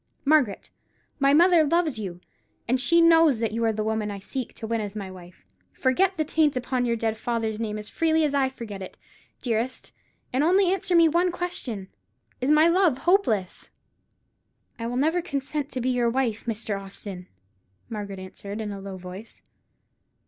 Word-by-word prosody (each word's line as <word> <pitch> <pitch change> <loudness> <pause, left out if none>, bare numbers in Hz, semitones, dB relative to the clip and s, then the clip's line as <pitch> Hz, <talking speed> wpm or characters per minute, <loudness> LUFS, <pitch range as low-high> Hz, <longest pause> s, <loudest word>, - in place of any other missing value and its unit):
Margaret, 280 -8 +2 0.5
my 275 0 +4
mother 340 +2 +6
loves 310 -5 +1
you; 180 -4 -6 0.5
and 255 +2 +1
she 335 +7 +4
knows 330 -5 +6
that 225 -1 0
you 230 +1 -2
are 225 - +3
the 215 0 -2
woman 220 -1 -1
I 200 - -5
seek 250 +5 -5
to - - -7
win 225 0 -1
as 205 0 -6
my 195 -3 -5
wife. 180 -1 -14 0.3
Forget 360 +9 +1
the 310 - 0
taint 300 -3 +2
upon 250 0 -1
your 235 - +1
dead 225 -1 -2
father's 225 -3 -2
name 215 -2 -3
as 210 0 -6
freely 320 -1 +1
as 295 -2 +1
I 270 -2 +2
forget 225 -7 -8
it, 185 - -9 0.5
dearest; 240 +1 -2 0.4
and 260 +3 +2
only 370 +3 +4
answer 370 -1 0
me 335 -1 +7
one 345 +3 +2
question: 260 - -4 0.5
Is 255 - 0
my 305 +2 +6
love 340 -5 +3
hopeless?" 265 - +1 1.1
"I 230 - -3
will 245 +1 -3
never 320 +6 +2
consent 285 -2 -3
to 255 - -2
be 255 - 0
your 245 -1 +2
wife, 230 -3 -1
Mr. 215 -3 -3
Austin!" 195 -1 -8 0.6
Margaret 205 -3 -6
answered, 200 +2 -8
in 215 -2 -4
a 200 -1 -7
low 195 -1 -7
voice. 185 +4 -10
245 Hz, 180 wpm, -25 LUFS, 210-310 Hz, 1.1 s, me